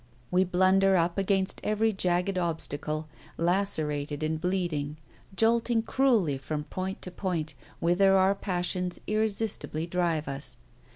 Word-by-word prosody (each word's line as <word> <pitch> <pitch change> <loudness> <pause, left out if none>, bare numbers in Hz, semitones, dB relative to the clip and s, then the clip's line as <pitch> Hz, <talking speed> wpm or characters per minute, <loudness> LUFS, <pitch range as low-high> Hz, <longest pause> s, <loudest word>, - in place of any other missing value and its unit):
We 185 +1 +4
blunder 190 +1 +4
on 170 0 +2
against 195 0 +1
every 215 +1 +1
jagged 180 0 0
obstacle, 155 -3 -2 0.3
lacerated 155 -5 0
and 155 0 -1
bleeding, 170 -5 -1 0.4
jolting 230 +1 +2
cruelly 225 - +2
from 150 +2 -4
point 190 +4 -5
to 180 - -5
point, 175 -5 -3 0.3
whither 195 +3 +4
our 190 +1 +4
passions 180 -2 -2
irresistibly 215 -6 -1
drive 170 -3 0
us. 135 -2 -4
180 Hz, 120 wpm, -28 LUFS, 155-195 Hz, 0.4 s, We